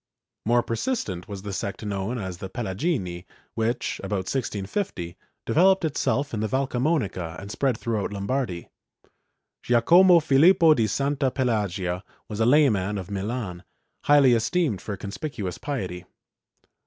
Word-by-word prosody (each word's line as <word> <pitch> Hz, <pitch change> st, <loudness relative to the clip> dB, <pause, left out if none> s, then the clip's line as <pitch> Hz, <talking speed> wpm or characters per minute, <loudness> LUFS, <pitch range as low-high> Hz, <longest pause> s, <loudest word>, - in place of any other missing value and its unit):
^ -, -, 0 dB
More 120 Hz, 0 st, +4 dB
persistent 115 Hz, -, -3 dB
was 100 Hz, -2 st, -7 dB
the 100 Hz, -1 st, -5 dB
sect 100 Hz, +3 st, -4 dB
known 100 Hz, +4 st, -2 dB
as 95 Hz, -5 st, -5 dB
the 95 Hz, -, -6 dB
Pelagini 95 Hz, -, -3 dB, 0.3 s
which, 115 Hz, +1 st, -2 dB
about 95 Hz, -2 st, -2 dB
1650, 100 Hz, -, -3 dB, 0.3 s
developed 190 Hz, +2 st, +4 dB
itself 145 Hz, -2 st, -1 dB
in 110 Hz, -, -2 dB
the 110 Hz, -, 0 dB
Valcamonica 125 Hz, -, -1 dB
and 100 Hz, +1 st, -8 dB
spread 130 Hz, 0 st, 0 dB
throughout 110 Hz, -2 st, -2 dB
Lombardy. 100 Hz, -2 st, -3 dB, 0.9 s
Giacomo 170 Hz, +10 st, +6 dB
Filippo 160 Hz, +3 st, +5 dB
di 115 Hz, -6 st, +1 dB
Santa 140 Hz, +5 st, 0 dB
Pelagia 100 Hz, -8 st, -1 dB, 0.2 s
was 105 Hz, -1 st, -6 dB
a 110 Hz, -, +3 dB
layman 110 Hz, -8 st, +3 dB
of 95 Hz, 0 st, -7 dB
Milan, 100 Hz, -2 st, -4 dB, 0.4 s
highly 145 Hz, -4 st, +6 dB
esteemed 120 Hz, -, +1 dB
for 100 Hz, -2 st, -5 dB
conspicuous 100 Hz, -, -5 dB
piety. 95 Hz, -11 st, -4 dB
110 Hz, 130 wpm, -25 LUFS, 95-140 Hz, 0.9 s, Giacomo